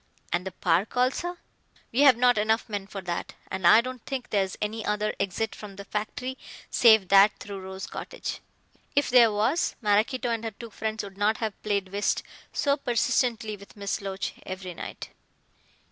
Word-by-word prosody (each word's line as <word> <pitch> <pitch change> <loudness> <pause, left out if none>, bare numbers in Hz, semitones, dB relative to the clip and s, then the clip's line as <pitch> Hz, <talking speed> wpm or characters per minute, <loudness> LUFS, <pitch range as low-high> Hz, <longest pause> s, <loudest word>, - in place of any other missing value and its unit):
"And 175 +2 0
the - - -4
park 180 +6 0
also?" 305 +8 +1 0.5
"We 240 - -1
have 275 -4 +7
not 245 -2 +4
enough 220 +2 +1
men 205 -3 -4
for 200 -1 -6
that. 175 -1 -4 0.2
And 190 -2 +1
I 220 - +8
don't 255 -1 -7
think 270 -3 -5
there's 195 -3 0
any 215 +1 -2
other 210 0 0
exit 200 +3 -1
from 205 -2 -10
the 200 0 -9
factory 250 +6 -4 0.3
save 220 -6 +6
that 200 +1 +6
through 200 -1 -7
Rose 190 0 -6
Cottage. - - -6 0.6
If 285 -2 +2
there 240 -3 +7
was, 220 +11 +1
Maraquito 230 +3 +1
and 230 -1 -2
her 225 - -2
two 225 +2 -11
friends 220 +1 -3
would 200 -1 -10
not 215 +2 +2
have 220 -3 -4
played 200 -3 -1
whist 200 +2 0 0.3
so 280 -1 +1
persistently 235 -3 0
with 200 +1 -15
Miss 200 0 -2
Loach 195 -1 -4
every 185 -1 -6
night." - - -7
210 Hz, 175 wpm, -27 LUFS, 195-240 Hz, 0.6 s, I